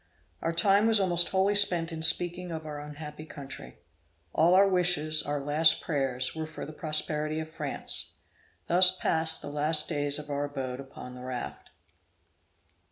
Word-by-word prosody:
Our 165 - -1
time 200 +5 +3
was 225 -2 +5
almost 175 -3 +3
wholly 195 +1 +1
spent 180 -5 +2
in 160 -1 -6
speaking 175 +2 +2
of 160 -1 -6
our 150 -1 -7
unhappy 150 +1 -9
country. 140 -3 -10 0.6
All 170 +3 +3
our 195 +1 +5
wishes, 175 -5 +2
our 145 0 -3
last 150 +3 +3
prayers, 135 -4 -2
were 160 -1 -5
for 155 - -8
the 155 - -10
prosperity 155 0 -2
of 160 0 -7
France. - - 0 0.5
Thus 185 +1 +5
passed 160 -1 +1
the 145 - -7
last 150 +1 +1
days 145 -2 -1
of 150 -1 -8
our 145 0 -2
abode 135 -3 -6
upon 135 -2 -10
the 125 - -11
raft. 125 -1 -7
155 Hz, 165 wpm, -28 LUFS, 145-175 Hz, 0.6 s, was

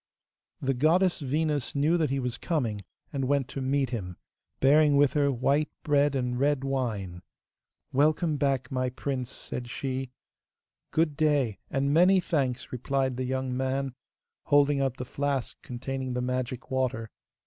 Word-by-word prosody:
The 135 0 +2
goddess 170 +8 +3
Venus 150 0 -1
knew 150 +4 +3
that 160 -4 +1
he 135 +1 0
was 125 -2 -3
coming, 120 -11 -1 0.3
and 135 -2 -1
went 140 -2 +1
to 135 - -5
meet 135 -1 0
him, 90 -7 -4 0.4
bearing 145 +1 +5
with 145 -1 +4
her 145 -2 +3
white 140 +4 +1
bread 145 -1 +3
and 125 -2 -1
red 140 0 +2
wine. 110 -10 -2 0.7
'Welcome 150 +3 +2
back, 135 -2 0
my 130 -1 0
prince,' 130 -1 -3
said 120 -1 -7
she. 130 0 -3 0.8
'Good 155 -2 +1
day, 145 - +1
and 140 +1 0
many 180 +4 +6
thanks,' 135 -8 -1
replied 130 +1 -1
the 130 +1 -2
young 130 0 -2
man, 130 0 -1 0.5
holding 145 -1 +4
out 135 -2 0
the 125 - -4
flask 140 -1 -2
containing 130 +1 -4
the 125 - -1
magic 125 0 -3
water. 125 -4 -1
135 Hz, 150 wpm, -28 LUFS, 125-145 Hz, 0.8 s, many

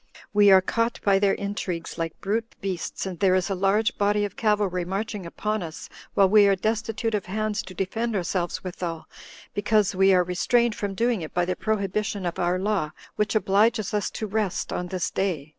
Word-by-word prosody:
We 205 -1 +6
are 190 -1 +7
caught 230 +4 0
by 195 -1 +4
their 200 -1 +3
intrigues 200 -4 -4
like 165 -1 -3
brute 225 +3 -2
beasts, 190 -2 -4
and 185 -3 -5
there 185 -2 +4
is 185 +1 0
a - - +2
large 195 +4 +1
body 205 0 +2
of 200 - -7
cavalry 205 -5 +1
marching 195 +1 -4
upon 215 +5 -2
us, 160 -3 -7 0.3
while 195 - +6
we 205 +1 +6
are 200 - +4
destitute 225 +2 -1
of 205 -3 -2
hands 215 +1 -1
to 185 - -11
defend 220 +5 -2
ourselves 175 -1 -2
withal, 175 -3 -5 0.5
because 210 0 +2
we 190 +1 +4
are 180 -1 +5
restrained 235 +6 +2
from 200 -2 -4
doing 230 -2 +1
it 155 - -8
by 175 0 +2
the 185 +1 -1
prohibition 205 -1 -1
of 175 - -3
our 175 +1 +1
law, 190 -5 0 0.3
which 210 +1 0
obliges 215 +1 +2
us 210 -2 0
to 220 - -2
rest 210 -3 -2
[on 180 - -3
this 180 0 -2
day]." 170 -7 -2
200 Hz, 195 wpm, -25 LUFS, 185-215 Hz, 0.5 s, are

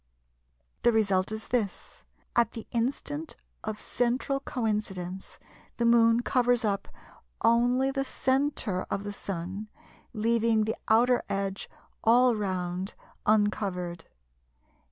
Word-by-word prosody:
The 240 - +5
result 200 -4 +2
is 220 0 -5
this; 225 -6 -2 0.3
at 235 -1 +3
the 225 - -7
instant 280 +6 -2 0.3
of 215 -1 -4
central 250 +3 0
coincidence 210 -8 -3 0.4
the 235 - +1
Moon 235 0 +5
covers 245 -2 +2
up 200 -2 -1 0.6
only 245 +3 +3
the 270 0 -1
centre 260 -8 0
of 195 - -2
the 205 0 -5
Sun, 195 +2 -5 0.4
leaving 225 0 +2
the 220 +1 -1
outer 240 +3 +4
edge 195 0 -2 0.3
all 245 +1 +5
round 185 -2 -3 0.3
uncovered. 195 -5 +1
220 Hz, 110 wpm, -28 LUFS, 195-245 Hz, 0.6 s, The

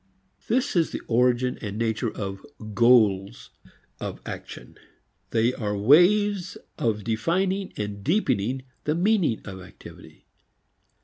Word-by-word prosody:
This 250 +1 0
is 165 -2 +2
the - - -5
origin 125 +1 +2
and 105 -2 -5
nature 115 +1 -1
of 95 -2 -6 0.3
"goals" 110 -3 +3 0.5
of - - -5
action. - - -9 0.5
They 115 +2 +2
are 105 -4 -3
ways 180 - +4 0.2
of 110 -3 0
defining 185 - -1
and 105 -1 -5
deepening 130 - 0 0.2
the 150 - +1
meaning 180 - +1
of 95 -2 -8
activity. - - -14
120 Hz, 115 wpm, -25 LUFS, 105-175 Hz, 0.5 s, ways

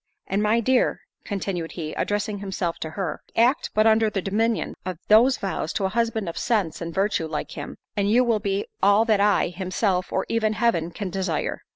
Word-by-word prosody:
And 195 +2 -1
my 215 +2 +3
dear," 255 +2 +2 0.2
continued 190 -5 -3
he, 155 -3 -5
addressing 205 0 -2
himself 190 -4 -3
to 160 - -4
her, 165 0 -4
"act 245 +6 +3
but 215 +1 +4
under 220 0 +4
the 205 - -2
dominion 220 +4 0
of 185 -2 -4
those 235 +5 +6
vows, 190 -5 -3
to 195 - -1
a - - +1
husband 225 -2 -1
of 170 - -4
sense 180 -9 0
and 170 0 -4
virtue, 190 -2 0
like 155 -1 -4
him, - - -7 0.2
and 200 -1 +1
you 240 +4 +5
will 230 -3 +2
be 200 -1 -1 0.2
all 205 +3 +5
that 215 -3 +3
I, 205 -3 +3
himself, 185 +1 -1
or 190 - 0
even 220 -1 +1
Heaven 215 -8 +1
can 185 +2 -5
desire. 185 -4 -2
200 Hz, 200 wpm, -24 LUFS, 180-220 Hz, 0.2 s, those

